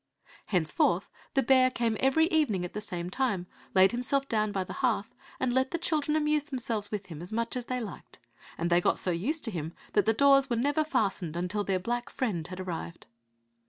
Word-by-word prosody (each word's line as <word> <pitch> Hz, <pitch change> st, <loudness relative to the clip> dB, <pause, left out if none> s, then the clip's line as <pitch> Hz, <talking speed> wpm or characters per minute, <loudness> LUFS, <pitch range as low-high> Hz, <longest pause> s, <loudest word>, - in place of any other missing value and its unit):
Henceforth 175 Hz, 0 st, +1 dB, 0.3 s
the 270 Hz, -, +4 dB
bear 255 Hz, +1 st, +5 dB
came 235 Hz, -3 st, 0 dB
every 270 Hz, +5 st, +4 dB
evening 255 Hz, -, +1 dB
at 180 Hz, -, -8 dB
the 210 Hz, -, -4 dB
same 180 Hz, -3 st, -4 dB
time, 205 Hz, -7 st, 0 dB, 0.3 s
laid 190 Hz, 0 st, +6 dB
himself 270 Hz, +3 st, 0 dB
down 215 Hz, -3 st, +1 dB
by 195 Hz, -2 st, -1 dB
the -, -, -8 dB
hearth, 230 Hz, -5 st, 0 dB, 0.3 s
and 255 Hz, -2 st, 0 dB
let 260 Hz, +1 st, +2 dB
the 340 Hz, -, -1 dB
children 305 Hz, -3 st, 0 dB
amuse 300 Hz, -1 st, +1 dB
themselves 235 Hz, -7 st, -2 dB
with 205 Hz, -2 st, -4 dB
him 165 Hz, -4 st, -9 dB
as 180 Hz, -, -6 dB
much 230 Hz, +2 st, -1 dB
as 250 Hz, -1 st, -3 dB
they 255 Hz, 0 st, -2 dB
liked; 215 Hz, -6 st, -8 dB, 0.4 s
and 170 Hz, +1 st, -1 dB
they 175 Hz, +1 st, +5 dB
got -, -, +2 dB
so 180 Hz, -, -1 dB
used 250 Hz, -, -1 dB
to 225 Hz, -, -1 dB
him 165 Hz, -3 st, -4 dB, 0.2 s
that 205 Hz, -, +3 dB
the 225 Hz, -, +5 dB
doors 275 Hz, +2 st, +5 dB
were 240 Hz, -, +1 dB
never 285 Hz, +6 st, +1 dB
fastened 195 Hz, -, -1 dB
until 180 Hz, +4 st, -1 dB
their 195 Hz, -2 st, 0 dB
black 240 Hz, +6 st, -3 dB
friend 190 Hz, -11 st, -2 dB
had 185 Hz, 0 st, -8 dB
arrived. 170 Hz, -2 st, -6 dB
225 Hz, 210 wpm, -29 LUFS, 185-265 Hz, 0.4 s, laid